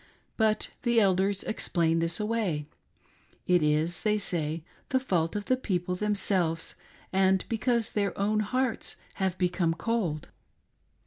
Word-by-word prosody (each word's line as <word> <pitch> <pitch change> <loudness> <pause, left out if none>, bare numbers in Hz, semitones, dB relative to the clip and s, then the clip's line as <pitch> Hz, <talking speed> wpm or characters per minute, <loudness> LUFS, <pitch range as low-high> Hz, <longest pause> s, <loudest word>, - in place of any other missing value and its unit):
But 215 -1 +2
the 240 -1 +3
elders 195 0 +2
explain 165 -6 0
this 165 0 0
away. 210 -9 -1 0.8
It 180 -1 +4
is, 155 +3 +1
they 215 -1 +2
say, 165 -5 -1 0.3
the 260 - +3
fault 175 -10 0
of 205 -1 -2
the 255 - +3
people 180 -8 -2
themselves, 185 -5 0 0.4
and 190 0 +3
because' 230 0 +1
their 200 -2 -1
own 210 +2 +2
hearts 250 +3 -1 0.2
have 190 -2 0
become 175 -2 +1
cold. 180 -8 -1
190 Hz, 130 wpm, -28 LUFS, 170-215 Hz, 0.8 s, It